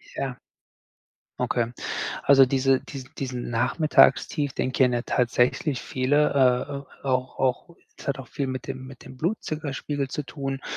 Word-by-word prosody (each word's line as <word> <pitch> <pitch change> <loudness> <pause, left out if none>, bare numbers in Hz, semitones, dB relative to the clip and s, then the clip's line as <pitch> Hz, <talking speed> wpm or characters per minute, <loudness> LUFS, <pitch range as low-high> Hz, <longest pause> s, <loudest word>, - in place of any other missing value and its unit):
Ja. 135 -2 -3 1.0
Okay. 120 0 0 0.5
Also, 135 -1 +7
diese 135 0 +2
dies 135 -3 -8
diesen 125 -3 -4
Nachmittagstief, 135 - +3
den 130 - -1
kennen 125 -2 +2
tatsächlich 125 +3 +1
viele, 145 +4 +2
äh, 130 +1 +2
äh, 140 - -7 0.2
auch 130 0 0
auch 130 +6 -1 0.2
es - - -12
hat 140 0 -1
auch 135 - -8
viel 140 - -3
mit 130 -1 -5
dem 130 0 -5
mit 130 -1 -12
dem 130 - -12
Blutzuckerspiegel 150 -4 -2
zu 150 - -3
tun. 135 -2 -5
135 Hz, 145 wpm, -25 LUFS, 125-140 Hz, 1.0 s, Also